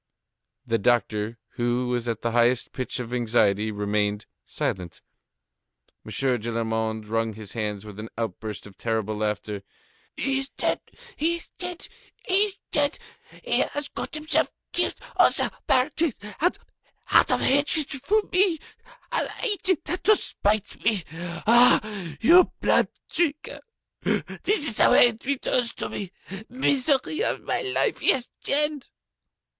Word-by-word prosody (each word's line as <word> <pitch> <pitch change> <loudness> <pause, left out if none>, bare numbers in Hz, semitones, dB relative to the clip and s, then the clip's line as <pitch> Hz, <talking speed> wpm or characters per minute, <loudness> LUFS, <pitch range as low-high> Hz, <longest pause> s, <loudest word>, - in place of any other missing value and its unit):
The 115 -2 0
doctor, 110 0 0 0.2
who 120 +1 0
was 120 -1 -1
at 115 -2 -3
the 115 - 0
highest 120 +1 +2
pitch 130 0 -4
of 120 -1 -5
anxiety, 110 -3 +2
remained 105 0 -1 0.2
silent. 90 -3 -4 1.0
M. - - -11
Gillenormand 110 -3 -1
wrung 115 0 -1
his 105 -1 -9
hands 105 -3 -3
with 105 -1 -10
an 110 +1 -7
outburst 110 -1 -5
of 100 -2 -14
terrible 110 -2 -2
laughter. 105 -1 -3 0.6
"He 270 0 +2
is 270 0 -5
dead! - - -1 0.4
He 330 +3 +1
is 340 - -10
dead! 360 0 -5 0.4
He 370 - 0
is 400 0 +3
dead! 290 +1 +2 0.5
He - - +1
has 290 0 -1
got - - -5
himself 310 +1 0 0.2
killed - - +1 0.2
on - - +7
the - - 0 0.2
barricades! 280 +2 +1 0.2
Out 355 +3 0
of - - +2
hatred 285 +2 +3
to 390 +11 0
me! 365 -2 +4 0.9
He 425 -5 +2
did 370 -4 +1
that 355 +3 -3
to 430 - +7
spite 210 - -2
me! 210 -6 +1 0.4
Ah! 240 +2 +7 0.4
You 350 +10 +6
blood - - +3 0.2
drinker! 310 -3 -1 0.4
This 375 -8 0
is 220 - -3
the - - +5
way 240 - +7
he - - -7
returns 250 -3 0
to - - -3
me! 195 -3 -5 0.4
Misery 270 - +1
of - - -1
my - - 0
life, 395 -2 0
he - - +5
is 255 -2 -2
dead!" 295 -1 +1
135 Hz, 140 wpm, -25 LUFS, -, 1.0 s, on